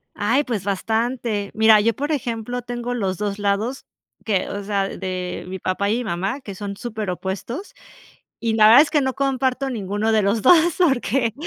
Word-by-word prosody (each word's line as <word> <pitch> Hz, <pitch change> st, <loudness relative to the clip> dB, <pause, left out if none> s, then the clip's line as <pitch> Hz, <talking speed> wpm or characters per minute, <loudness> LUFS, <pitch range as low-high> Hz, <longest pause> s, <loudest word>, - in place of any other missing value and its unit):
Ay, 235 Hz, +8 st, +1 dB
pues, 225 Hz, -8 st, -3 dB
bastante. 220 Hz, +1 st, -1 dB
Mira, 220 Hz, 0 st, +6 dB
yo, 230 Hz, +2 st, +2 dB
por 290 Hz, +3 st, -2 dB
ejemplo, 245 Hz, -2 st, -3 dB
tengo 240 Hz, 0 st, -4 dB
los 195 Hz, -6 st, -1 dB
2 205 Hz, 0 st, -3 dB
lados 205 Hz, +6 st, -1 dB, 0.4 s
que 200 Hz, -4 st, 0 dB
o 200 Hz, 0 st, -5 dB
sea, 200 Hz, -1 st, -1 dB
de 185 Hz, -2 st, -5 dB
mi 190 Hz, 0 st, -5 dB
papá 195 Hz, +2 st, -1 dB
y 230 Hz, -, +1 dB
mi 250 Hz, -, -3 dB
mamá, 195 Hz, +6 st, -2 dB
que 200 Hz, -, -8 dB
son 200 Hz, +1 st, -6 dB
superopuestos, 215 Hz, -, -5 dB, 0.6 s
y 230 Hz, -1 st, -1 dB
la 215 Hz, -1 st, +6 dB
verdad 240 Hz, +6 st, +9 dB
es 300 Hz, -, -2 dB
que 295 Hz, -, +3 dB
no 265 Hz, -1 st, -1 dB
comparto 270 Hz, -1 st, 0 dB
ninguno 210 Hz, 0 st, -1 dB
de 215 Hz, -1 st, +3 dB
los 200 Hz, +3 st, +1 dB
2, 335 Hz, +3 st, +5 dB
porque, 265 Hz, -, +2 dB
220 Hz, 185 wpm, -22 LUFS, 200-250 Hz, 0.6 s, verdad